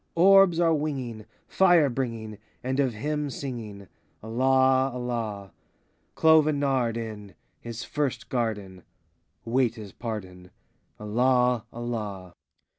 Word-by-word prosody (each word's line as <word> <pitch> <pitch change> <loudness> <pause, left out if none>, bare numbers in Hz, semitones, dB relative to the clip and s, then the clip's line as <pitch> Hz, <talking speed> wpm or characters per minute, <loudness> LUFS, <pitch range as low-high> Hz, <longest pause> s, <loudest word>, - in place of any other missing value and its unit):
Orbs 190 -1 +6
are 165 -1 +4
winging. 130 -8 -3 0.2
Fire 175 -5 +4
bringing, 115 -5 -4 0.2
And 130 +2 -2
of 130 -5 +1
him 150 +5 -2
singing,— 115 -8 -7 0.4
Allah, 130 +3 +3
Allah! 115 -5 -4 0.6
Clove 160 -1 +5
and 150 -2 0
nard, 130 -5 0
in 105 -3 -7 0.2
His 115 0 -7
first 145 -3 -3
garden. 105 -7 -3 0.6
Wait 120 0 +1
his 105 -4 -9
pardon,— 95 -6 -7 0.5
Allah, 125 +2 +2
Allah! 105 -6 -5
120 Hz, 110 wpm, -26 LUFS, 110-135 Hz, 0.6 s, Orbs